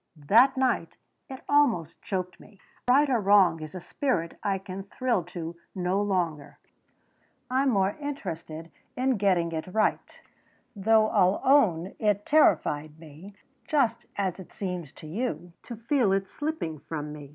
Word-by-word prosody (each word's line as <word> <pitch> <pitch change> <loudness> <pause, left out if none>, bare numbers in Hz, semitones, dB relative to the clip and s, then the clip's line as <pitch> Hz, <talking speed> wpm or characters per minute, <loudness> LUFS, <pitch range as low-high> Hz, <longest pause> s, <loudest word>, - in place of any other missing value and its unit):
That 230 - +4
night 255 -10 0 0.3
it 265 -1 -8
almost 240 - +2
choked 185 -2 -4
me. 200 -3 -18 0.3
That 245 - +5
'right 285 +2 +4
or 245 - +3
wrong' 190 -5 +4
is 155 +3 -8
a - - -4
spirit 175 - -2
I 200 -2 0
can 190 0 -7
thrill 215 0 -1
to 170 -1 -7 0.2
no 185 +2 0
longer. 175 -8 -2 0.9
I'm 265 +1 +2
more 195 -4 +1
interested 165 - -6 0.3
in 260 -1 +1
getting 185 -4 +1
it 160 +1 -4
right. 215 +4 -1 0.6
"Though 215 +2 +3
I'll 190 -2 +3
own 195 - +3
it 210 -1 +1
terrified 155 - +2
me, 165 +6 -13 0.3
just 235 -6 +1
as 190 -2 -2
it 185 - -11
seems 180 -7 -5
to - - -13
you, 175 -2 -4
to 240 - -8
feel 235 -1 +1
it 195 0 0
slipping 290 - -4
from 150 0 -6
me. 145 -2 -10
195 Hz, 150 wpm, -27 LUFS, 170-235 Hz, 0.9 s, That